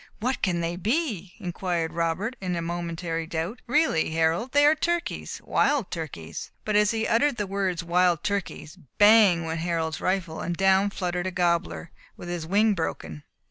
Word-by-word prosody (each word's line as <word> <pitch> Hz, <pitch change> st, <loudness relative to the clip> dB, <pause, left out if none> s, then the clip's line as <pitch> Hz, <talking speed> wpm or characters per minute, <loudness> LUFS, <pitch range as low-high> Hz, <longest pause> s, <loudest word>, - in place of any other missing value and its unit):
"What 255 Hz, +4 st, -1 dB
can 175 Hz, -3 st, 0 dB
they 170 Hz, +1 st, -2 dB
be!" 215 Hz, -, -2 dB
inquired 175 Hz, -3 st, -2 dB
Robert, 170 Hz, +8 st, -1 dB
in 180 Hz, -2 st, -2 dB
momentary 170 Hz, -1 st, -3 dB
doubt. 170 Hz, +9 st, -4 dB
"Really, 285 Hz, -, +2 dB
Harold, 165 Hz, +9 st, 0 dB
they 290 Hz, +1 st, +5 dB
are 300 Hz, -, +7 dB
turkeys! 340 Hz, +2 st, -2 dB
wild 280 Hz, -9 st, +1 dB
turkeys!" 85 Hz, -, -6 dB, 0.2 s
But 215 Hz, -, 0 dB
as 210 Hz, 0 st, +4 dB
he 225 Hz, 0 st, -1 dB
uttered 240 Hz, +3 st, +2 dB
the 205 Hz, -, -1 dB
words 190 Hz, -3 st, -2 dB
"wild 175 Hz, -1 st, +2 dB
turkeys," 200 Hz, -6 st, -4 dB, 0.2 s
bang! 205 Hz, -5 st, +6 dB
went 160 Hz, 0 st, -3 dB
Harold's 165 Hz, -1 st, -2 dB
rifle, 185 Hz, -4 st, -1 dB
and 175 Hz, -1 st, -3 dB
down 195 Hz, +1 st, +4 dB
fluttered 180 Hz, -2 st, -3 dB
a -, -, -2 dB
gobler, 170 Hz, -, -1 dB, 0.3 s
with 175 Hz, -, -8 dB
his 170 Hz, -2 st, -4 dB
wing 210 Hz, +4 st, +3 dB
broken. 80 Hz, -, -4 dB
180 Hz, 165 wpm, -26 LUFS, 165-210 Hz, 0.3 s, are